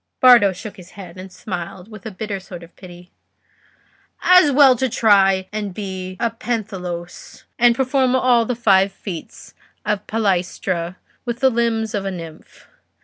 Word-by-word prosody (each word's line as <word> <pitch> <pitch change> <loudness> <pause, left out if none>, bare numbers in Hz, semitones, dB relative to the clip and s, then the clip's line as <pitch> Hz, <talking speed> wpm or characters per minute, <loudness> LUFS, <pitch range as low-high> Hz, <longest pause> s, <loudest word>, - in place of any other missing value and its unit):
Bardo 240 -6 +7
shook 200 +3 -9
his 180 -2 -14
head, 185 -2 -10
and 190 0 -10
smiled 180 0 -7
with 215 0 -10
a - - -4
bitter 205 0 -5
sort 180 -2 -10
of 170 - -16
pity. 180 -1 -14 1.1
"As 365 -5 +6
well 270 -2 +6
try 205 -6 +3
to 210 -1 -3
be 185 -1 -6
a 235 - 0
pentathlos 195 -7 -6 0.2
and 240 0 +5
perform 260 0 +1
all 250 -2 +3
the 250 - -2
five 195 -4 +3
feats 190 -4 -9 0.3
of 210 -1 0
the - - -36
palaestra 185 -4 -1 0.3
with 240 -1 -4
the 265 0 +3
limbs 225 -2 -1
of 200 -1 -2
a - - -1
nymph. 165 -4 -10
200 Hz, 155 wpm, -20 LUFS, 185-235 Hz, 1.1 s, Bardo